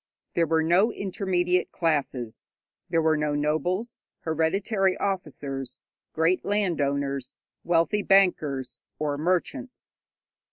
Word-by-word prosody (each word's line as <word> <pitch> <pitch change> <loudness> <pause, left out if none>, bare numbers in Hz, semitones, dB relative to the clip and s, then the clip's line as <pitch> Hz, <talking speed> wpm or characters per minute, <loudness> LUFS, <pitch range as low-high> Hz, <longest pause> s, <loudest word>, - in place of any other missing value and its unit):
There 170 -1 +2
were 160 +1 +2
no 180 +8 +4
intermediate 180 -3 0
classes. 140 -8 -2 0.4
There 165 -2 +2
were 160 0 +4
no 150 -1 0
nobles, 175 +10 -1 0.2
hereditary 190 +5 +1
officers, 140 -9 -3 0.3
great 165 +3 +2
landowners, 140 -9 -1 0.3
wealthy 175 +5 +2
bankers 145 -11 +2 0.2
or 150 -1 -1
merchants. 185 - -2
165 Hz, 95 wpm, -26 LUFS, 145-190 Hz, 0.4 s, no